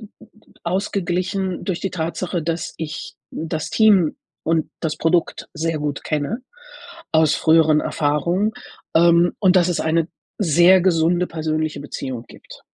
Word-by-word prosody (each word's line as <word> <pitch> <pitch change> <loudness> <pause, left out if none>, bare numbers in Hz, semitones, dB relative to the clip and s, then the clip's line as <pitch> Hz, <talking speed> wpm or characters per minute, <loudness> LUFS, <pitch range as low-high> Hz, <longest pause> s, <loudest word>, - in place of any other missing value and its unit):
d 215 - -11 0.6
ausgeglichen 185 0 -2
durch 185 -4 -2
die 195 - -1
Tatsache, 170 +1 -3
dass 165 +1 -3
ich 160 -1 -6 0.2
das 160 -1 -4
Team 200 -8 +4 0.3
und 165 -1 0
das 160 -2 -2
Produkt 165 +1 0
sehr 165 0 -1
gut 145 -1 -4
kenne, 155 - -2 0.7
aus 160 -1 +4
früheren 160 -1 +4
Erfahrungen, 170 +9 0 0.4
ähm, 170 +1 +5
und 190 -2 +4
dass 175 -1 +3
es 175 - -1
eine 160 0 +1 0.3
sehr 175 0 +5
gesunde 175 0 +2
persönliche 155 -2 -2
Beziehung 130 -4 -6
gibt. - - -14
165 Hz, 130 wpm, -21 LUFS, 155-180 Hz, 0.7 s, ähm